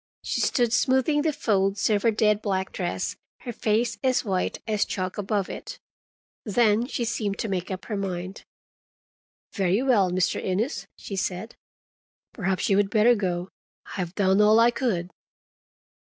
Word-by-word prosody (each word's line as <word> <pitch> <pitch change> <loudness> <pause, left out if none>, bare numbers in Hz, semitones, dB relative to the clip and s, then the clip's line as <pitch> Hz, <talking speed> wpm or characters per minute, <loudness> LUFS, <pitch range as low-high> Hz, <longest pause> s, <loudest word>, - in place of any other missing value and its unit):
She - - -1
stood 240 -3 +1
smoothing 265 +4 +2
the 315 +1 +1
folds 200 -7 +1
of 205 -1 +2
her 230 - +3
dead 210 -1 +2
black 190 -2 -1
dress, 175 -2 -3 0.3
her 240 - -6
face 220 0 0
as 255 -2 +2
white 190 -3 -1
as 210 -2 +1
chalk 185 +1 -4
above 205 -1 -1
it. - - -7 0.7
Then 225 +1 +2
she 245 -4 -2
seemed 215 -3 -2
to - - -2
make 185 -3 -3
up 190 -1 -5
her 215 - -3
mind. 185 -1 -4 1.1
"Very 195 +3 +1
well, 220 -9 +3
Mr. 180 0 0
Innes," 210 +10 -2
she 200 - -7
said. 190 +3 -3 0.8
"Perhaps 190 -3 -1
you 195 - +3
would 205 -1 +2
better 225 +3 +5
go. 180 -4 -2 0.4
I - - -7
have 180 0 -3
done 195 0 +3
all 215 +2 +6
I 235 +1 +5
could." 185 -9 -2
205 Hz, 160 wpm, -25 LUFS, 190-230 Hz, 1.1 s, all